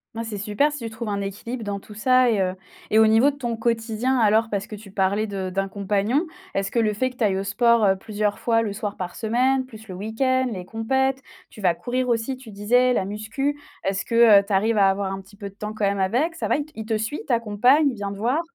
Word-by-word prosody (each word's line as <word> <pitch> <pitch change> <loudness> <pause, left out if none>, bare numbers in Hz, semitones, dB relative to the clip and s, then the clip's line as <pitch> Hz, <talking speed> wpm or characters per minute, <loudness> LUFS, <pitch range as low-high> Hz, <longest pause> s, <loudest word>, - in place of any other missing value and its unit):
Bah, 230 - -3
c'est 225 -2 -5
super 210 +9 +1
si 295 - -6
tu - - -3
trouves 225 0 -6
un 200 -1 -1
équilibre 220 +5 -5
dans 200 -1 -3
tout 210 - -13
ça 255 +3 +3
et 215 - +1
heu, 185 -1 0 0.4
et 215 - +3
au 220 - +7
niveau 225 +6 +5
de 285 - -5
ton 240 -4 -3
quotidien, 230 +2 0
alors? 220 -1 +3
Parce 200 -1 -2
que 215 - -8
tu 205 -1 -12
parlais 200 +2 0
de 195 -2 -4
d'un 195 +1 -1
compagnon. 205 - 0 0.3
Est-ce 195 0 -1
que 235 - +1
le 215 -2 +2
fait 255 +5 0
que 250 - -17
tu 245 - -1
ailles 195 -2 +1
au 195 - -2
sport, 235 +3 +3
heu, 190 -1 +4
plusieurs 210 0 -2
fois 230 -1 +2
le 220 -3 -2
soir 205 0 -4
par 180 -1 -5
semaine, 255 +4 +1
plus 220 -3 -13
le - - -5
week-end, 260 +6 0
les 185 -4 -6
compètes, 265 +5 0 0.3
tu 215 - -13
vas 180 -3 +3
courir 250 +6 -2
aussi, 240 +2 -1
tu 250 -4 -12
disais, 245 +5 +2
la 215 - +1
musculation. 225 +8 -3 0.2
Est-ce 195 0 -1
que, 230 -3 +6
heu, - - -2
tu 205 - -2
arrives 215 +3 +2
à 195 -1 +5
avoir 195 0 -1
un 195 0 -5
petit 190 +1 -18
peu 200 -1 -7
de 195 - -21
temps 215 0 -5
quand 215 -1 -1
même 200 0 0
avec 250 - +1
ça 330 - -3
va, - - +2 0.2
il 220 - -6
te 220 0 0
suit, 220 +7 -3
il - - -14
t'accompagne, 245 +5 +3
il 255 - -5
vient 200 -2 -4
te - - -9
voir? 245 +9 +1
220 Hz, 265 wpm, -23 LUFS, 200-245 Hz, 0.4 s, au